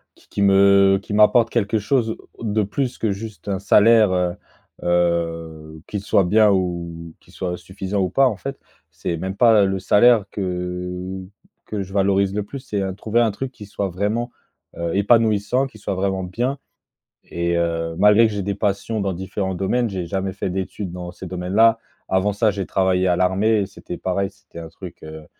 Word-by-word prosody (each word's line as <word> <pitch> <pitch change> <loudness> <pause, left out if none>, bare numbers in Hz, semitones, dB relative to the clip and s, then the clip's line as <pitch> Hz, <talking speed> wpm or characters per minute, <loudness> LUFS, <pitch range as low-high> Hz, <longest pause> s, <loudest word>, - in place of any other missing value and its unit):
qui - - -25
qui 100 - -3
me 100 0 +5
qui 105 - -7
m'apporte 110 +2 +5
quelque 110 -1 0
chose 110 +1 0 0.3
de 110 -1 0
plus 125 +5 -2
que 110 -3 0
juste 100 -2 -8
un 100 - -1
salaire, 105 +1 +5
heu 90 -1 0 0.5
heu, 85 -3 -1
qu'il 105 - -4
soit 100 -1 +2
bien 105 +4 +4
ou 85 -3 -3
qu'il - - -22
soit 90 -1 -3
suffisant 95 +2 -4
ou 90 - 0
pas, 135 +6 +4
en 110 - -1
fait. 135 +4 -6 0.3
C'est 80 +2 -4
même 95 +3 -4
pas 110 -4 +5
le 95 0 -1
salaire 110 +2 +4
que 90 0 -4 0.5
que 105 -2 -4
je 95 +1 -8
valorise 100 0 +2
le 105 - -1
plus, 140 +7 -8
c'est 105 -6 -3
heu, 95 -1 -2
trouver 110 +4 0
un 115 -3 +2
truc 130 +5 -5
qui 110 -5 -11
soit 100 0 -3
vraiment, 105 +7 -2 0.5
heu, 85 0 -2
épanouissant, 110 +4 +2
qui 110 - -15
soit 100 - -4
vraiment 95 0 -1
bien 120 +10 -2 0.7
et 85 0 -2
heu, 85 -1 -1
malgré 105 +3 +6
que 110 - -2
j'ai 100 -1 -3
des 100 +1 -2
passions 105 +2 -1
dans 100 -1 -1
différents 95 +1 -3
domaines, 115 +6 0
j'ai 90 -3 -4
jamais 95 +1 -2
fait 95 0 -4
d'études 95 0 -4
dans 90 -1 -6
ces 95 - -9
domaines 90 +1 -5
là. 115 +1 +5 0.3
Avant 95 +2 +1
ça, 105 +2 +2
j'ai 100 -1 -3
travaillé 95 -1 +1
à 90 - +2
l'armée 100 +4 +2
et - - -3
c'était 95 -3 -9
pareil, 95 +2 -1
c'était 100 - -15
un 80 - -8
truc, 85 +1 -11
heu, 80 0 -9
95 Hz, 195 wpm, -21 LUFS, 90-105 Hz, 0.7 s, malgré